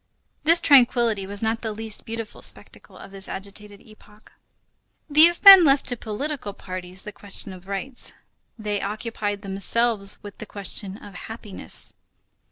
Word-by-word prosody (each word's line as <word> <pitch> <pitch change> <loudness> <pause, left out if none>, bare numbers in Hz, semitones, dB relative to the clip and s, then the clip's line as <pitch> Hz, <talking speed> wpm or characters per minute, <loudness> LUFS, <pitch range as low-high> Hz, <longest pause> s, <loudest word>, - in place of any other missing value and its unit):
This 335 +2 +6
tranquillity 240 - +4
was 200 +2 -5
not 225 0 -1
the 220 - -3
least 220 0 -5
beautiful 225 -1 -7
spectacle - - -2
of 195 - -12
this 195 0 -7
agitated 200 +1 -8
epoch. 215 -2 -20 0.8
These 320 +3 +5
men 390 -3 +11
left 275 -2 +3
to 245 - 0
political 240 +1 -5
parties 185 0 -8
the 210 - -8
question 200 -1 -4
of 185 0 -14
rights, 200 +7 -5 0.5
they 210 -2 -3
occupied 205 -1 -4
themselves 200 +1 0
with 205 -1 -11
the 215 - -8
question 200 0 -1
of 205 -2 -13
happiness. 215 +1 -6
210 Hz, 145 wpm, -23 LUFS, 200-235 Hz, 0.8 s, men